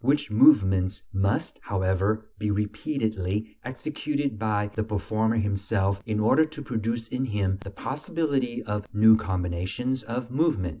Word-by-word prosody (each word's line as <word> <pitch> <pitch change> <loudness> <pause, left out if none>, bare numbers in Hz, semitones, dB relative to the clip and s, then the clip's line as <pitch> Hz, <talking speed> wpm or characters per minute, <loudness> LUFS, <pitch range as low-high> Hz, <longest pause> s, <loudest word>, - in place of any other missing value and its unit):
which 145 0 +1
movements 95 -6 +4
must, 95 +1 0
however, 95 +3 0
be 105 -1 -1
repeatedly 105 -1 -2
executed 140 -1 -3
by 105 -2 0
the 110 - -2
performer 110 +1 0
himself 100 -1 0
in 105 -1 0
order 130 +8 +5
to 155 -1 -6
produce 115 -3 -3
in 130 +1 -1
him 100 -5 0
the 100 - -7
possibility 140 - -2
of 105 -1 -3
new 110 +1 +7
combinations 95 +6 -2
of 120 +2 -5
movement. 135 - +1
110 Hz, 135 wpm, -26 LUFS, 100-130 Hz, -, new